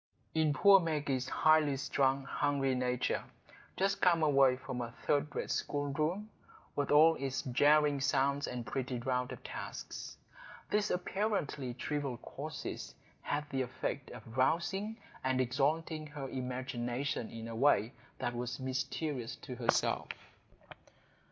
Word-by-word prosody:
In 160 -2 +3
poor 195 +6 +7
Maggie's 145 -6 -1
highly 155 -3 +4
strung, 135 0 +1
hungry 140 -1 0
nature,—just 125 +9 -2
come 170 -3 +4
away 135 -3 +5
from 125 -1 -5
a 115 -1 -6
third 145 0 +2
rate - - -2
schoolroom, 155 +9 -1 0.4
with 145 -1 0
all 155 +3 +7
its 135 -1 -2
jarring 145 +2 +4
sounds 140 +1 +2
and 125 -2 -4
petty 125 +3 -2
round 125 +1 -1
of - - -8
tasks,—these 210 0 -5
apparently 180 - -1
trivial 140 -2 -2
causes - - -6 0.3
had 150 0 -2
the 135 -1 0
effect 130 +2 -3
of 115 -1 -10
rousing 190 +11 +1 0.3
and 130 0 +1
exalting 150 +5 0
her 145 -2 -6
imagination 125 -1 -3
in 115 0 -7
a 115 - -6
way 120 -2 +3 0.2
that 120 -2 -2
was 125 +1 -3
mysterious 130 0 -2
to 130 - -8
herself. 120 -1 +1
135 Hz, 125 wpm, -33 LUFS, 125-150 Hz, 0.4 s, poor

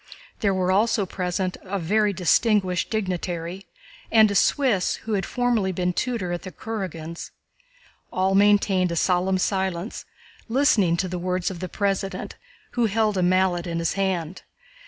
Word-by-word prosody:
There 200 - +2
were 185 -1 +1
also 205 +1 +2
present 185 0 -2
a 200 +1 -4
very 205 +4 +1
distinguished 185 0 +2
dignitary 185 -3 -3 0.4
and 220 -2 +6
a - - -1
Swiss 215 -3 +2
who 220 - -2
had 195 -2 -1
formerly 240 -6 0
been 180 0 -1
tutor 230 -5 -2
at 175 - -3
the 185 - -8
Kurágins'. 170 -5 -6 0.8
All 190 +1 +1
maintained 195 -2 +3
a - - -2
solemn 185 +2 +2
silence, 190 +1 -2 0.4
listening 225 - +3
to 185 - -1
the 180 0 -4
words 180 +1 -1
of 180 - -8
the 185 0 -5
President, 195 0 -2 0.4
who 240 -2 +1
held 215 0 +1
a 185 - +1
mallet 180 -1 +2
in 170 -1 -3
his 165 -1 0
hand. 190 -3 -2
190 Hz, 155 wpm, -24 LUFS, 180-205 Hz, 0.8 s, and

